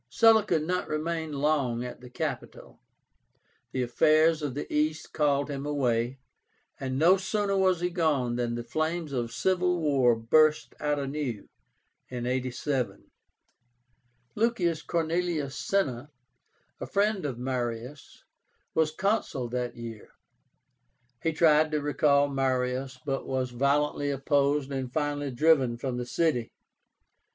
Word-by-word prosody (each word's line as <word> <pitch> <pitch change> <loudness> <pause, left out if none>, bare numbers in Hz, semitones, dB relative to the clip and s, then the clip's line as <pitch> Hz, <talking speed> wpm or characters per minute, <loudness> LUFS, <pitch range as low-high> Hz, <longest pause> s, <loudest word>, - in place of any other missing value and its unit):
Sulla 225 -2 +5
could 165 -6 0
not 180 +3 -1
remain 160 +1 -2
long 140 -5 0
at 125 - -8
the 125 - -11
capital. - - -6 0.9
The 130 - -1
affairs 155 +6 +3
of 145 -4 -3
the 145 - -3
East 155 +1 -1
called 145 -2 +1
him 140 -2 -4
away; 130 -4 0 0.6
and 130 -1 -3
no 175 +6 +5
sooner 200 +1 -1
was 185 -2 +2
he 180 0 0
gone 150 -9 +1
than 120 -1 -1
the 120 - -4
flames 155 +5 -2
of 120 -3 -2
civil 180 +6 +1
war 135 -6 +3
burst 150 +7 +3
out 150 0 0
anew 135 -6 -3 0.6
(87). 125 +1 -3 1.2
LUCIUS 195 -8 +1
CORNELIUS 165 -4 -1
CINNA, 145 -9 -1 0.7
a - - -4
friend 205 -1 +1
of 135 -5 -3
Marius, 125 +1 -5 0.5
was 160 -1 +2
Consul 160 - -1
that 125 0 -3
year. 115 -2 -9 1.1
He 165 - +1
tried 155 -1 +4
to 155 -1 0
recall 145 0 +3
Marius, 130 -1 -1
but 135 -1 -2
was 130 -1 -1
violently 145 +3 +1
opposed 140 0 +1
and 130 -2 -3
finally 145 0 -1
driven 130 -3 +3
from 125 0 -3
the 125 0 -4
city. 135 -6 0
145 Hz, 125 wpm, -28 LUFS, 125-160 Hz, 1.2 s, Sulla